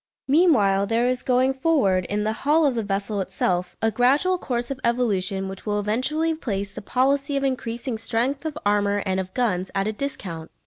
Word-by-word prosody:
Meanwhile 230 - +4
there 230 +3 +1
is 250 0 0
going 255 +1 +2
forward, 260 - +2
in 205 +2 -2
the 215 +1 0
hull 305 +3 +3
of 280 - +3
the 230 - -1
vessel 200 0 -2
itself, 185 -1 -1
a 225 - +3
gradual 285 +11 +2
course 240 -3 -2
of 270 - -4
evolution 200 -5 0
which 190 0 -8
will 210 -1 -1
eventually 265 +10 0
place 200 -10 -4
the - - -7
policy 275 +5 +1
of 275 - -1
increasing 240 -2 -2
strength 245 +5 -1
of 310 -2 -4
armour 205 0 +2
and 190 -1 0
of 185 0 -6
guns 190 -7 0
at 195 +1 0
a 215 - -1
discount. 180 - -5
230 Hz, 190 wpm, -24 LUFS, 200-270 Hz, -, Meanwhile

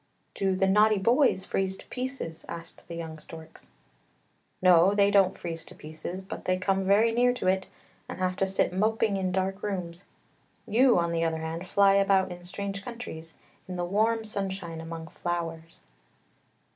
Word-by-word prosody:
" - - -44
Do 195 -1 0
the 195 +1 +2
naughty 210 +2 +4
boys 230 -1 +3
freeze 190 0 -1
to - - -14
pieces? 250 -11 -5
" - - -25
asked 165 0 -9
the 170 - -7
young 160 -2 -6
storks. 160 +1 -13 0.5
" - - -41 0.3
No, 180 +2 +6
they 200 0 +4
don't 195 -2 +4
freeze 165 -1 -6
to - - -13
pieces, 160 +4 -7
but 190 - -8
they 185 0 +2
come 195 +1 0
very 210 +4 +4
near 245 +2 +3
to - - -5
it 190 0 +1 0.4
and - - -6
have 185 0 0
to 195 - +1
sit 190 -1 0
moping 215 +1 +1
in 190 -1 -1
dark 190 +1 -1
rooms; 180 -3 -4 0.6
you, 245 +2 +4
on 170 -1 +1
the 165 0 0
other 165 -1 0
hand, 165 +3 -5
fly 200 +1 +5
about 195 -1 +3
in 175 0 -9
strange 195 +2 -5
countries, 165 -10 -8 0.3
in 185 - -5
the 175 0 -2
warm 220 +4 +1
sunshine 190 -5 -4
among 165 0 -7
flowers." 165 -1 -5
190 Hz, 185 wpm, -28 LUFS, 170-200 Hz, 0.6 s, No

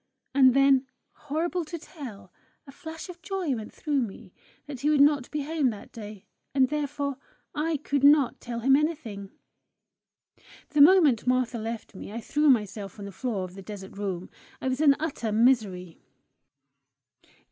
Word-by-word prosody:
And 260 -2 +6
then, 275 -1 +4 0.2
horrible 330 +4 -2
to 335 +3 -6
tell! 280 - -10 0.3
a 275 - -12
flash 320 +3 -9
of 350 -1 -11
joy 375 -7 -2
went 220 -3 -6
through 290 -3 -1
me, 205 -3 -7 0.3
that 285 -3 -8
he 295 - +1
would 300 -2 +3
not 285 -2 +4
be 300 -1 -3
home 300 -3 +1
that 210 -3 -8
day, 210 -3 -10 0.3
and 260 -2 +4
therefore 285 -2 -2 0.4
I 315 0 -1
could 280 -1 -2
not 285 -2 +5
tell 235 -1 -5
him 270 +3 +5
anything! 275 -11 -2 1.4
The 300 -1 +3
moment 295 - +6
Martha 250 -1 +1
left 225 +1 -6
me 195 - -9
I 230 - -5
threw 295 +5 +1
myself 210 -5 0
on 200 - -7
the 200 - -7
floor 215 -3 -3
of 180 -1 -7
the 195 - -10
desert 195 -1 -9
room. 190 -3 -4 0.3
I 260 - -2
was 260 +3 -1
in 285 -3 +6
utter 280 -8 -3
misery. 210 -7 +1
265 Hz, 165 wpm, -27 LUFS, 215-300 Hz, 1.4 s, And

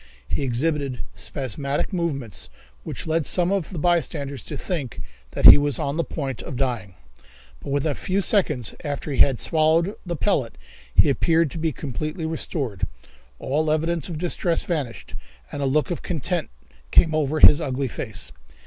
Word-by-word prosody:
He - - -2
exhibited 140 +1 -1
spasmodic 140 - -2
movements 140 - -3 0.3
which - - -6
led 160 0 +1
some 180 +4 +1
of 195 -4 -1
the 185 - -7
bystanders 145 -5 0
to - - -5
think 150 - -4 0.3
that - - 0
he - - +12
was 145 -1 0
on 140 +1 -2
the 170 - +1
point 135 -8 -4
of 135 - -7
dying, 120 -8 -2 0.6
but - - -8
within 145 +2 +1
a - - -1
few 185 +7 -1
seconds 155 - +1
after 145 0 -4
he 135 - -3
had 135 -4 +5
swallowed 160 +4 +3
the 175 -2 -3
pellet 135 - 0 0.4
he - - +6
appeared 160 +2 +2
to 165 - -6
be 160 0 0
completely 155 +4 -4
restored. 140 - -2 0.5
All 155 - -1
evidences 165 +1 0
of 165 - -4
distress 170 0 +1
vanished, 145 -9 -4 0.4
and 145 - -4
a - - 0
look 150 +5 +1
of 175 - -3
content 160 -7 -2 0.4
came 160 - +5
over 155 0 0
his 150 +1 +8
ugly 135 -2 -1
face. 115 - -5
150 Hz, 165 wpm, -23 LUFS, 135-165 Hz, 0.6 s, he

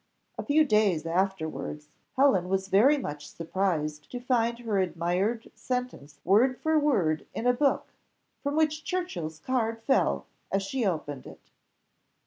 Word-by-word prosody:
A - - -5
few 305 +1 +4
days 210 - +2
afterwards, 160 -5 -2 0.3
Helen 205 -10 +3
was 190 0 -1
very 255 +10 +5
much 145 - -5
surprised 160 -4 -2
to 245 - -5
find 235 -2 +1
her 225 -4 -1
admired 185 +5 -1
sentence 250 - -5
word 235 +8 +4
for 315 0 +2
word 185 - +1
in 230 - -3
a 245 - +5
book, 275 +3 0 0.5
from 285 0 -2
which 310 0 +1
Churchill's 180 - -3
card 230 +4 -1
fell 270 +3 +1 0.3
as 195 0 +1
she 245 +6 -2
opened 145 -6 -3
it. - - -15
200 Hz, 140 wpm, -28 LUFS, 165-255 Hz, 0.5 s, very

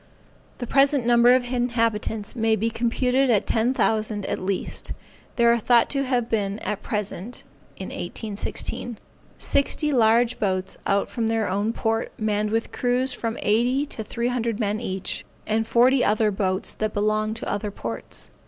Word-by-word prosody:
The 245 - -4
present 275 0 +3
number 240 +1 +6
of 255 - +2
inhabitants 230 -3 -1
may 225 -2 +2
be 225 +2 -1
computed 250 +3 +1
at 215 -5 +3
ten 230 +2 +2
thousand 215 -4 0
at - - -2
least. 190 0 -3 0.4
They 235 - +3
are 235 0 +5
thought 235 +1 +3
to 275 -1 0
have 245 -3 -1
at 205 0 -1
present 210 +2 -4 0.3
(1816), 220 +2 -4 0.4
sixty 295 +1 +1
large 235 0 +3
boats 190 -2 -1
out 200 0 +2
from 230 -2 -2
their 225 -1 0
own 205 +4 0
port, 225 0 -1
manned 210 -1 0
with 225 +1 -1
crews 250 +1 0
of - - -8
from 230 -1 -2
eighty, 245 +7 +2
to 230 -6 -6
three 235 +3 -2
hundred 235 -3 -1
men 210 -1 0
each, 190 -5 -3 0.2
and 220 +1 0
forty 250 +3 +4
other 215 0 +2
boats 190 -1 -1
that 215 -1 -3
belong 215 +1 0
to 225 - -5
other 205 +1 -2
ports. 115 - -5
225 Hz, 160 wpm, -24 LUFS, 210-245 Hz, 0.4 s, number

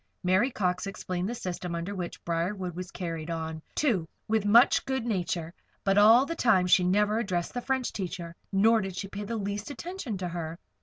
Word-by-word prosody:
Mary 190 +8 +3
Cox 185 -5 -1
explained 185 -1 -3
the 240 - -3
system 180 -4 -4
under 170 +4 -3
which 180 -3 -6
Briarwood 175 +1 -2
was 180 0 -5
carried 165 -3 -5
on, 160 -1 -4
too, 215 - +1 0.2
with 220 -1 +1
much 230 +4 +6
good 265 -3 -2
nature; 175 -6 -2 0.3
but 195 -1 +2
all 225 +5 +7
the 335 - -4
time 220 - +4
she 180 0 +5
never 210 +4 +2
addressed 180 -6 -2
the 245 - -2
French 260 -1 -1
teacher, 175 -3 -5 0.2
nor 220 +3 +4
did 190 -2 -5
she 195 - -4
pay 205 +1 -6
the 230 +2 -3
least 205 +2 -3
attention 290 - -5
to 180 -1 -3
her. 165 -1 -5
195 Hz, 195 wpm, -28 LUFS, 175-220 Hz, 0.3 s, all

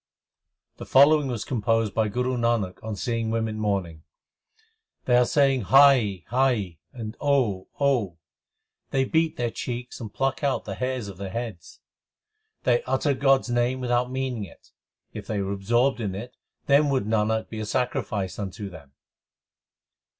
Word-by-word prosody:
The - - -8
following 145 +2 +5
was 120 -4 -3
composed 115 -3 0
by 110 -1 +1
Guru 125 +4 -1
Nanak 115 -6 -1
on 110 -1 -4
seeing 115 +2 -2
women 110 -1 -2
mourning: 95 -7 -2 1.0
They 125 - +3
are 125 0 +4
saying 135 -6 +2
Hai 130 - +5
hai! 120 -10 +1
and 115 -2 -7
Oh 125 -10 +1
Oh!; 120 - +1 0.7
They 135 -1 +1
beat 160 +3 +1
their 120 -1 -1
cheeks 125 +1 -5
and 110 -3 -6
pluck 135 +6 -1
out 140 -1 0
the - - -4
hairs 125 -3 -3
of 100 -3 -9
their 95 0 -5
heads; 110 -4 -7 0.8
They 485 - +3
utter 145 -3 +1
God 135 0 +3
s - - -9
name 120 +1 +1
l - - -7
without 125 0 +1
meaning 130 -4 -2
it: 90 - -14 0.4
if - - -8
they 105 - -2
were 100 0 -2
absorbed 120 +7 +1
in 100 -4 -3
it, 120 +6 -8 0.3
Then 145 +1 +4
would 135 -6 0
Nanak 110 0 0
be 110 - -6
a 110 - -3
sacrifice 110 -6 -2
unto 100 0 -5
them. 70 -6 -13
120 Hz, 160 wpm, -25 LUFS, 105-130 Hz, 1.0 s, following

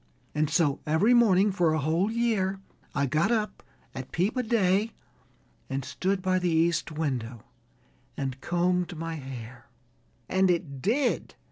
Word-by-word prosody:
And 150 0 +1
so 160 -3 +2
every 160 +11 +4
morning 205 -4 +5
for 175 -4 +2
a - - +1
whole 165 +7 +1
year 220 -5 0 0.4
I 140 0 +2
got 155 - +1
up 215 -2 -1 0.3
at 130 -1 -7
peep 190 +8 0
o' 255 - +1
day 215 -2 +2 0.8
and 135 -1 -3
stood 190 0 -1
by 185 -1 +2
the 180 -1 0
east 165 0 +1
window 130 -7 -3 0.7
and 135 -1 -4
combed 180 0 0
my 165 0 -4
hair." 130 -2 -9 0.6
"And 190 0 +2
it 160 -6 -1
did?" 245 - 0
175 Hz, 145 wpm, -27 LUFS, 145-195 Hz, 0.8 s, morning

